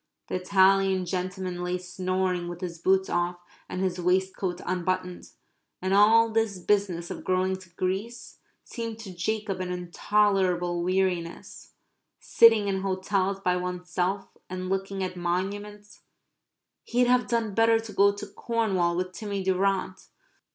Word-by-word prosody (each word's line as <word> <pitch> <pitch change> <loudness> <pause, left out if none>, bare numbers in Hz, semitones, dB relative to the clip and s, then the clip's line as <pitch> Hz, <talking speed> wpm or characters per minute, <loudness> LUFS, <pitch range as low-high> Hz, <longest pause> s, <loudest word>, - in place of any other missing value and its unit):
The - - -5
Italian 190 0 +3
gentleman 185 0 -3
lay 180 0 -1
snoring 185 0 -2
with 175 +1 -7
his 170 -2 -5
boots 190 +2 +2
off 175 0 -1 0.3
and 185 - -3
his 185 -1 -1
waistcoat 185 0 0
unbuttoned.... 185 0 -2 0.5
And 185 +1 -1
all 225 +3 +6
this 220 -3 0
business 180 -2 0
of - - -6
going 185 0 +1
to 185 -2 -15
Greece 195 +7 -4 0.2
seemed 230 -2 -6
to 195 -4 -8
Jacob 200 +2 -2
an 180 -1 -3
intolerable 180 -1 +1
weariness 180 -2 -2 0.5
sitting 225 -3 +5
in 190 -1 -1
hotels 195 0 -1
by 180 -1 +1
oneself 180 +2 -3
and 185 0 -4
looking 195 0 -2
at 185 0 -4
monuments 205 +4 -4 0.9
he'd 245 +1 +2
have 250 0 +3
done 230 -3 0
better 225 +1 +4
to 225 -2 -8
go 200 +1 +5
to 205 +1 -7
Cornwall 195 -5 0
with 185 0 -2
Timmy 200 0 -4
Durrant.... 190 0 0
190 Hz, 135 wpm, -27 LUFS, 180-205 Hz, 0.9 s, all